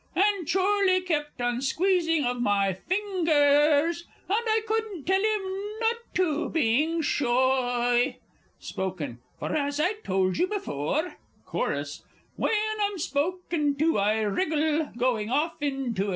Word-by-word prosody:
"_ - - +2
And 395 -5 +2
Chorley 380 0 +3
kept 295 -7 -2
on 245 0 0
squeezing 330 +1 +1
of 245 0 -1
my 200 -4 +2
fingers, 320 - +2 0.2
And 425 +5 +1
I 440 0 +2
couldn't 435 -7 -2
tell 380 +2 +2
him 415 0 -2
not 460 0 +1 0.2
to, 335 -4 0
being 310 +4 +1
shoy. 245 -2 +1 0.4
Spoken 165 -10 -5 0.2
For, - - -3
as 285 -1 -1
I 355 +7 +2
told 185 -1 0
you 360 - +3
before, 320 - -2 0.3
Chorus - - -3 0.3
When - - 0 0.3
I'm 405 -1 0
spoken 300 -1 -1
to, 310 -3 +2
I 210 +2 +2
wriggle, 305 - 0
&c. 255 - -1
305 Hz, 125 wpm, -26 LUFS, 245-370 Hz, 0.4 s, Chorley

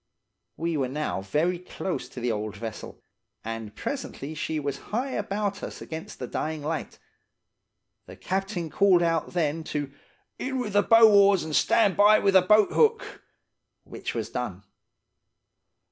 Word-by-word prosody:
"We 165 -1 -1
were 135 -2 0
now 150 -7 -3
very 155 - 0
close 180 -6 -5
to 130 - -9
the 120 0 -1
old 105 -1 -4
vessel, 110 0 -8 0.4
and 115 -2 -6
presently 160 - -5
she 155 0 -3
was 140 -2 -3
high 250 +5 -2
about 200 -2 -2
us - - -7
against 160 0 -8
the 125 - -5
dying 155 +4 -4
light. 155 +1 -4 1.1
The - - -10
captain 190 -4 -3
called 190 -3 +4
out 165 0 0
then 160 -2 0
to 145 -3 -3 0.5
'in 265 0 -3
with 225 -5 -3
the 205 - +5
bow 225 +1 +7
oars 200 -2 +5
and 155 -1 -3
stand 205 -5 +3
by 210 +1 +6
with 195 -2 +2
the 190 - +7
boat 210 +3 +4
hook,' 455 0 +1 0.6
which - - -6
was - - -3
done. - - -4
170 Hz, 155 wpm, -26 LUFS, 145-205 Hz, 1.1 s, bow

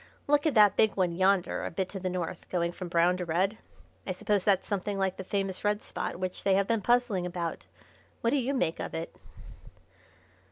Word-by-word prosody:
Look 290 +2 +3
at 305 - 0
that 205 -2 +6
big 220 -2 +3
one 180 -3 +1
yonder 190 0 +2
a - - -2
bit 185 +2 -2
to 195 - -6
the 185 0 -2
north, 180 -2 -4
going 170 -1 0
from 180 +1 -7
brown 175 +1 +3
to 180 - -3
red. 185 +6 0 0.5
I 185 - -1
suppose 200 +1 0
that's 195 -2 +2
something 200 0 -2
like 190 -1 0
the 190 - -5
famous 195 -1 -2
red 210 0 0
spot - - -4
which 185 +1 -4
they 195 -1 +3
have 195 0 +2
been 230 -2 +1
puzzling 235 -5 +2
about. 170 -2 -4 0.5
What 230 - +2
do 285 - +3
you 270 +1 0
make 165 -10 0
of - - -4
it?" 165 +1 -5
190 Hz, 210 wpm, -29 LUFS, 180-210 Hz, 0.5 s, that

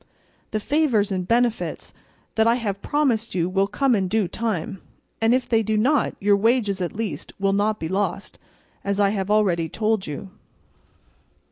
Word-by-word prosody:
The 215 - -1
favours 240 -6 +1
and 185 -2 -2
benefits 235 0 0 0.4
that 220 0 +3
I 230 - +4
have 205 -5 -3
promised 245 -8 0
you 170 -1 +1
will 195 +1 +1
come 265 +5 +1
in 195 -4 +1
due 210 0 +1
time, 195 -3 -3 0.4
and 225 +1 +4
if 255 +1 +2
they 225 -1 +3
do 220 0 0
not 265 +5 +2
your 200 +1 +4
wages 210 -3 +1
at 175 - -3
least 220 0 -4
will 195 0 +2
not 210 +2 +1
be 160 - -3
lost, 195 +2 -2 0.4
as 200 0 -1
I 200 -1 +4
have 195 -1 -2
already 185 -6 +2
told 215 0 0
you." 150 +6 -6
210 Hz, 170 wpm, -23 LUFS, 195-230 Hz, 0.4 s, I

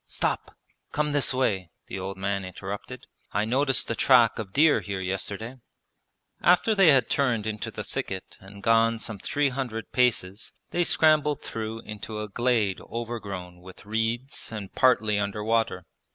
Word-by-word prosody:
'Stop! - - -2 0.4
Come 150 0 0
this 145 -1 +2
way,' 100 -9 0 0.2
the 95 - -6
old 95 0 -5
man 100 0 -1
interrupted. 100 +6 -7 0.3
'I 105 +2 +1
noticed 135 +3 +2
the - - -1
track 120 -1 +4
of 105 -4 -5
deer 150 +6 +5
here 100 -2 -4
yesterday.' 100 +6 -3 0.8
After 180 +6 +4
they 195 -4 +5
had 135 -4 +5
turned 125 -6 +1
into 110 -1 -3
the - - -6
thicket 95 -1 -5
and 100 +1 -13
gone 115 0 +4
some 110 -2 -6
three 145 +7 +1
hundred 125 -5 -4
paces 110 -5 0 0.2
they 175 - +2
scrambled 155 -3 +3
through 110 0 -5
into 105 0 -7
a 105 - -4
glade 110 -3 +1
overgrown 100 -7 -6
with 95 +1 -13
reeds 115 +5 -2
and 105 -4 -7
partly 110 -5 +3
under 100 +1 -2
water. 110 -5 0
110 Hz, 155 wpm, -26 LUFS, 100-130 Hz, 0.8 s, deer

